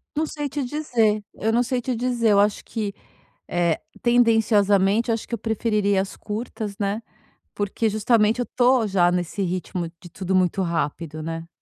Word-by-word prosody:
Não 310 - +1
sei 295 -2 -4
te 285 0 -3
dizer. 235 -7 +1
Eu 220 +1 0
não 240 +1 +3
sei 245 0 -1
te 250 0 -2
dizer, 240 -1 +1
eu 200 - +5
acho 205 0 +2
que, 210 -3 -3 0.5
eh, 170 -2 +1 0.2
tendenciosamente, 225 -3 +3
eu - - +3
acho 225 - -4
que - - -10
eu 235 - +1
preferiria 210 -3 +1
as 195 - -6
curtas, 210 -1 -5
né. 205 +2 -1 0.5
Porque 205 +2 -1
justamente 220 +2 +2
eu 245 - -1
tô 250 -1 +4
já 180 -3 +3
nesse 180 +3 -2
ritmo 180 -1 -2
de 175 - -12
tudo 190 +1 -3
muito 185 +1 +2
rápido, 160 -2 -2
né. 165 +1 -5
210 Hz, 175 wpm, -23 LUFS, 190-235 Hz, 0.5 s, eu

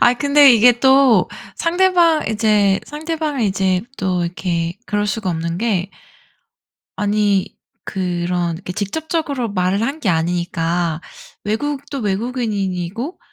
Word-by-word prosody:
아니 245 0 +5
근데 285 0 +6
이게 240 +1 +5
또 265 -7 +5 0.3
상대방 345 -2 +2
이제 210 -3 +2
상대방이 300 -5 -2
이제 190 -1 0
또 185 -2 -1
이렇게 170 -1 -3
그럴 205 0 -1
수가 200 -2 -2
없는 165 +1 -3
게 200 -4 -1 1.1
아니 205 -2 0 0.3
그런 175 -2 -2
이렇게 180 +1 -7
직접적으로 280 - -2
말을 185 +2 0
한 275 +6 -1
게 215 - -1
아니니까 170 0 -1 0.4
외국도 280 +6 -3
외국인 225 +3 -2
인이고 195 - -3
205 Hz, 260 characters per minute, -19 LUFS, 180-265 Hz, 1.1 s, 근데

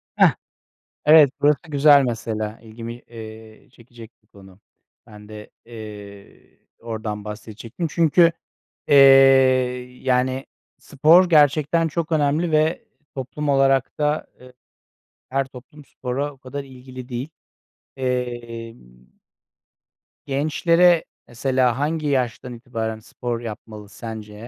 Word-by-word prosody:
Hah! - - +4 0.7
Evet, 150 -2 +7
burası 145 0 +3
güzel 145 -1 +5
mesela. 110 -2 -4
İlgimi, 115 +1 -8
eee, 110 -2 -13
çekecek 120 -2 -15
bir 105 - -38
konu. 95 0 -18 0.5
Ben 105 -1 -14
de, 105 -1 -11
eee, 105 -3 -12 0.2
oradan 110 -2 -6
bahsedecektim. 110 - -7
Çünkü, 165 +1 +4 0.6
eee, - - +4 1.1
yani, 130 +1 0 0.3
spor 165 +6 +4
gerçekten 155 +1 +3
çok 165 +1 -4
önemli 155 +3 +1
ve 155 +2 +1 0.3
toplum 140 +3 -5
olarak 135 -1 +2
da, 150 +1 0
eee, 125 0 -15 0.8
her 135 +1 0
toplum 135 +3 -14
spora 135 +4 -4
o 135 - -21
kadar 135 +2 -7
ilgili 130 -1 -11
değil, 125 +4 -5 0.7
emm 120 -2 -4 1.5
gençlere 165 +4 +2 0.2
mesela 125 0 0
hangi 155 +1 -1
yaştan 125 -2 -2
itibaren 115 -2 -5
spor 120 +2 -5
yapmalı 110 -2 -9
sence? 110 -2 -9
125 Hz, 105 wpm, -21 LUFS, 115-145 Hz, 1.5 s, Evet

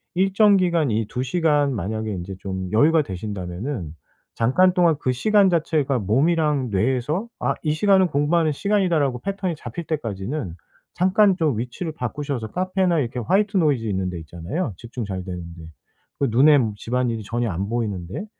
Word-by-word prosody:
일정 195 +2 +4
기간 170 -7 +1
이 110 0 0
2 125 - -3
시간 145 -1 +1
만약에 110 +2 -3
인제 95 +1 -6
좀 95 -1 -5
여유가 155 +8 +5
되신다면은 95 - -5 0.4
잠깐 180 +11 +3
동안 175 -3 +3
그 130 - 0
시간 205 - +3
자체가 155 -6 +1
몸이랑 140 - +1
뇌에서 130 - 0
'아 - - 0
이 155 - +1
시간은 190 +3 +4
공부하는 155 +2 +1
시간이다.' 195 0 +1
라고 135 -4 0
패턴이 195 -1 -3
잡힐 145 +4 -7
때까지는 115 - -4 0.4
잠깐 190 +2 +4
좀 155 - +1
위치를 125 +8 -5
바꾸셔서 135 -3 -4
카페나 185 -2 +1
이렇게 125 -2 -2
화이트 200 - +1
노이즈 145 -9 +2
있는 95 -3 -1
데 90 -2 -6
있잖아요 85 - -4
집중 120 +2 -6
잘 95 -2 -4
되는 90 -2 -5 0.2
데, 85 - -11 0.6
그 140 - +2
눈에 145 +5 +6 0.2
집안일이 115 -1 -2
전혀 120 +3 -2
안 95 +4 -3
보이는 105 -7 -2
데. 95 - -6
135 Hz, 360 characters per minute, -22 LUFS, 110-170 Hz, 0.6 s, 눈에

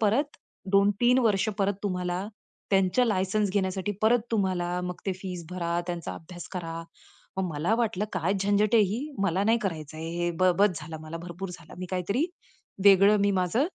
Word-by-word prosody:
परत 245 +8 +1 0.3
2-3 205 +6 +4
वर्ष 215 -3 +2
परत 200 0 +2
तुम्हाला 180 -1 -2 0.4
त्यांचं, 195 +5 +3
लायसन्स 200 0 +1
घेण्यासाठी 190 0 -1
परत 235 +2 +5
तुम्हाला 180 -4 0
मग 180 -1 -4
ते 190 - +1
फीस 180 -2 -6
भरा, 170 -1 -1
त्यांचा 175 -1 -4
अभ्यास 175 +1 -10
करा. 165 -2 -4 0.5
मग 190 - 0
मला 165 +9 +1
वाटलं, 215 -4 0
काय 185 0 0
झंझट 205 +2 +2
आहे 220 - +7
ही, 235 +10 -3
मला 190 +1 +1
नाही 225 +2 +4
करायच 155 -6 -4
आहे. 160 +1 -5
हे 175 0 0
बस 185 -1 +3
झाला 160 +1 -7
मला! 155 +1 -6
भरपूर 180 +2 -6
झाला. 165 -3 -11
मी 185 - -4
काहीतरी 200 - 0 0.6
वेगळं 200 +1 +7
मी 200 0 +3
माझं 190 - +1
190 Hz, 170 wpm, -27 LUFS, 175-205 Hz, 0.6 s, आहे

